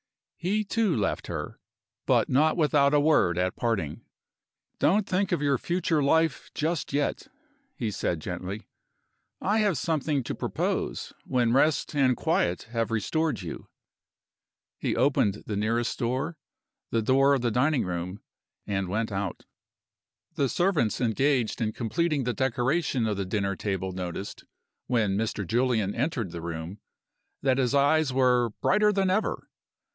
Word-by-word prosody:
He, 200 +5 0
too, 210 -3 +1
left 105 -4 -1
her - - -5 0.5
but - - +3
not 155 +6 +3
without 150 -3 +3
a - - +5
word 145 - +3
at 90 0 0
parting. 100 -11 -2 0.8
"Don't 200 +5 +3
think 190 +1 0
of 170 -4 0
your 140 -2 +2
future 170 -3 0
life 160 +1 +2
just 160 +1 -1
yet," 145 - -1 0.5
he 115 -3 -2
said, 90 -3 -1
gently. 90 +6 -6 0.7
"I 210 +3 +1
have 205 -7 +2
something 150 -1 0
to - - -4
propose - - -2
when 120 -2 +1
rest 150 +4 +2
and 130 -3 +3
quiet 90 - 0
have 115 -3 -1
restored 125 - -1
you." 85 - -7 1.1
He - - -1
opened 115 -6 +2
the 105 - -3
nearest 115 +3 0
door 135 +7 -2 0.5
the 115 -1 0
door 135 +4 +4
of 135 - -1
the 120 -1 0
dining 135 +2 +2
room 90 +3 -4 0.4
and 95 -2 -1
went 110 +4 -1
out. 100 -2 -4 0.9
The 140 -2 0
servants 175 - +1
engaged 125 0 +1
in 110 -1 0
completing 145 +5 0
the 125 0 -1
decoration 130 +2 0
of 105 -2 -1
the 100 - -2
dinner 100 0 -1
table 95 -1 -2
noticed, 90 +1 -6 0.4
when 110 -6 +1
"Mr. 105 -1 -2
Julian" 115 -2 +1
entered 120 - -2
the 85 - -6
room, 85 +3 -6 0.6
that 135 -1 +2
his 130 +1 +1
eyes 145 +1 +3
were 125 -2 +3
"brighter 210 0 +4
than 195 -2 +1
ever." 215 +3 -1
125 Hz, 145 wpm, -27 LUFS, 105-155 Hz, 1.1 s, a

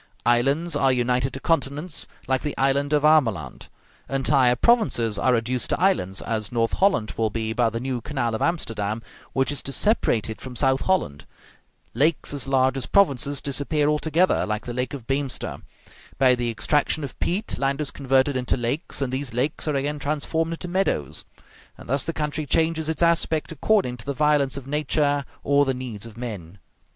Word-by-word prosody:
Islands 140 +8 +2
are 135 -2 +3
united 125 +1 +1
to 135 - -5
continents, 150 +1 -1 0.2
like 130 0 +1
the 150 - -4
island 140 +2 +1
of 150 -1 +2
Ameland; 115 - +2 0.4
entire 135 -2 +3
provinces 120 - +2
are 130 - +3
reduced 120 +2 -1
to - - 0
islands, 165 - +1
as 110 -2 -2
North 115 -1 0
Holland 190 - +2
will 110 -1 +1
be 110 +1 -2
by 115 0 +2
the 115 +1 -4
new 125 -1 -3
canal 120 -4 -2
of 110 - -3
Amsterdam, 115 - -1 0.3
which 135 0 +1
is 145 - -1
to 135 - -4
separate 135 - +2
it 110 - -7
from 130 -1 -8
South 135 +1 +2
Holland; 130 - 0 0.7
lakes 145 +5 +1
as 140 -2 -3
large 130 0 +2
as 135 - -4
provinces 140 -7 +2
disappear 145 +2 0
altogether, 160 +4 +2
like 105 0 -3
the 120 - -5
lake 125 +2 -2
of 130 -5 -10
Beemster; 135 0 -2 0.6
by 130 -1 +5
the 120 -1 -1
extraction 145 +6 0
of 140 - -7
peat, 200 +5 -1
land 140 +1 0
is 150 -2 +1
converted 135 0 +1
into 125 0 0
lakes, 130 +5 -2
and 130 -1 -3
these 130 -3 -3
lakes 140 +6 -1
are 150 - 0
again 145 +2 -1
transformed 155 +3 -1
into 165 - -6
meadows. 175 - -1 0.5
And - - -13
thus 140 +2 +1
the - - -2
country 150 -1 -3
changes 160 +2 +1
its 160 +1 0
aspect 165 -2 +1
according 160 -5 +1
to 115 - -11
the 140 - -2
violence 145 -2 +2
of 140 - -7
nature 145 0 0 0.2
or 140 0 +4
the 135 -2 0
needs 115 -4 -6
of 115 -1 -13
men. 100 -7 -7
135 Hz, 185 wpm, -24 LUFS, 120-150 Hz, 0.7 s, by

